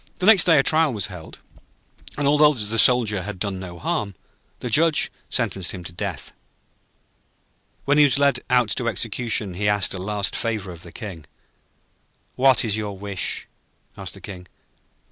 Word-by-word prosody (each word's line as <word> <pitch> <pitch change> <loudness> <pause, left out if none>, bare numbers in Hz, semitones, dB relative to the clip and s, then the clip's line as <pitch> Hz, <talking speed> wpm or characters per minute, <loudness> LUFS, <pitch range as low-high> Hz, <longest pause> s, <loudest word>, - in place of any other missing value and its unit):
Next 190 0 +6
day 165 -3 +5
a 135 - +4
trial 155 0 +3
was 105 -3 -2
held, 80 -3 -11 0.8
and 145 -1 0
although 150 +1 +5
the 110 -1 0
Soldier 110 -6 +4
had 105 +1 -6
done 95 0 -3
no 90 -2 -8
harm, 100 +3 -3 0.4
the - - -5
Judge 160 +4 +3 0.2
sentenced 100 -7 -1
him 90 -2 -8
to 85 - -8
death. 95 -4 -5 1.5
When 145 +2 +3
he - - +8
was 140 - +1
led 140 0 +2
out 125 -3 +3
to 120 - 0
execution 115 -2 -1
he 105 +3 -1
asked 105 -2 +1
a 95 - -6
last 100 0 -2
favour 110 -5 -3
of 85 -2 -11
the 85 - -11
King. 95 - -9 1.1
'What 130 -1 +4
is 105 -2 -1
your 105 -2 -5
wish?' 100 -2 -3 0.5
asked - - -4
the - - -13
King. 90 -3 -9
105 Hz, 165 wpm, -22 LUFS, 95-130 Hz, 1.5 s, he